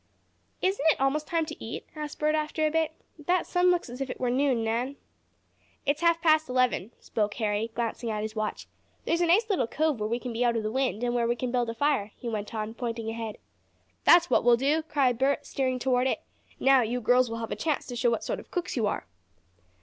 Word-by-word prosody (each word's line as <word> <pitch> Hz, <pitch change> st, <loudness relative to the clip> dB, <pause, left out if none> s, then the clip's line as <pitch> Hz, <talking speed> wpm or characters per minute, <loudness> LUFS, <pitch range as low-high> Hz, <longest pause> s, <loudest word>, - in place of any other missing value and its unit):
"Isn't 380 Hz, -4 st, +1 dB
it -, -, +2 dB
almost 285 Hz, +3 st, +1 dB
time 330 Hz, -1 st, 0 dB
to 310 Hz, 0 st, -8 dB
eat?" 225 Hz, -, -6 dB
asked 300 Hz, -1 st, -6 dB
Bert 305 Hz, 0 st, +1 dB
after 310 Hz, 0 st, 0 dB
a 305 Hz, -, +1 dB
bit. 320 Hz, 0 st, +1 dB, 0.3 s
"That 350 Hz, +4 st, +1 dB
sun 360 Hz, 0 st, +3 dB
looks 355 Hz, -1 st, +1 dB
as 250 Hz, +2 st, -8 dB
if 270 Hz, -, -2 dB
it -, -, -6 dB
were 250 Hz, -1 st, 0 dB
noon, 260 Hz, -3 st, +2 dB
Nan." 240 Hz, +5 st, -1 dB, 0.9 s
"It's 290 Hz, +3 st, 0 dB
half 335 Hz, -1 st, +4 dB
past 315 Hz, -3 st, +4 dB
eleven," 250 Hz, -5 st, +1 dB
spoke 210 Hz, -2 st, -2 dB
Harry, 215 Hz, 0 st, -1 dB
glancing 235 Hz, 0 st, -2 dB
at 215 Hz, -1 st, -2 dB
his 215 Hz, +1 st, -5 dB
watch. 215 Hz, -1 st, -3 dB, 0.4 s
"There's 335 Hz, +1 st, +1 dB
a 345 Hz, -, +3 dB
nice 415 Hz, +7 st, +4 dB
little 385 Hz, -, +1 dB
cove 300 Hz, -1 st, 0 dB
where 210 Hz, 0 st, -2 dB
we 235 Hz, -, 0 dB
can 245 Hz, -1 st, -6 dB
be 235 Hz, +2 st, 0 dB
out 235 Hz, -1 st, +2 dB
of 220 Hz, -, -2 dB
the 215 Hz, -, -2 dB
wind, 255 Hz, -3 st, -1 dB
and 240 Hz, 0 st, 0 dB
where 235 Hz, -1 st, +1 dB
we 240 Hz, -, +1 dB
can 245 Hz, 0 st, -3 dB
build 245 Hz, -2 st, 0 dB
a 230 Hz, -, -4 dB
fire," 265 Hz, -6 st, 0 dB
he 245 Hz, -, -8 dB
went 215 Hz, -1 st, -4 dB
on, 215 Hz, 0 st, -3 dB
pointing 230 Hz, -2 st, -4 dB
ahead. 225 Hz, -1 st, -5 dB, 0.7 s
"That's 345 Hz, 0 st, +7 dB
what -, -, +3 dB
we'll 240 Hz, -1 st, +5 dB
do!" 285 Hz, +5 st, +2 dB
cried 275 Hz, -6 st, +1 dB
Bert, 275 Hz, +1 st, +1 dB
steering 260 Hz, -2 st, -1 dB
toward 250 Hz, 0 st, +1 dB
it. -, -, -1 dB, 0.4 s
"Now 270 Hz, -1 st, +5 dB
you 240 Hz, +2 st, -1 dB
girls 245 Hz, +1 st, +3 dB
will 230 Hz, -, -4 dB
have 225 Hz, -1 st, -5 dB
a -, -, -1 dB
chance 310 Hz, -3 st, -1 dB
to 245 Hz, -, -6 dB
show 240 Hz, 0 st, +2 dB
what 230 Hz, -, -1 dB
sort -, -, -2 dB
of -, -, -13 dB
cooks 355 Hz, -1 st, -3 dB
you 225 Hz, -5 st, +1 dB
are." -, -, -2 dB
255 Hz, 240 wpm, -28 LUFS, 230-305 Hz, 0.9 s, That's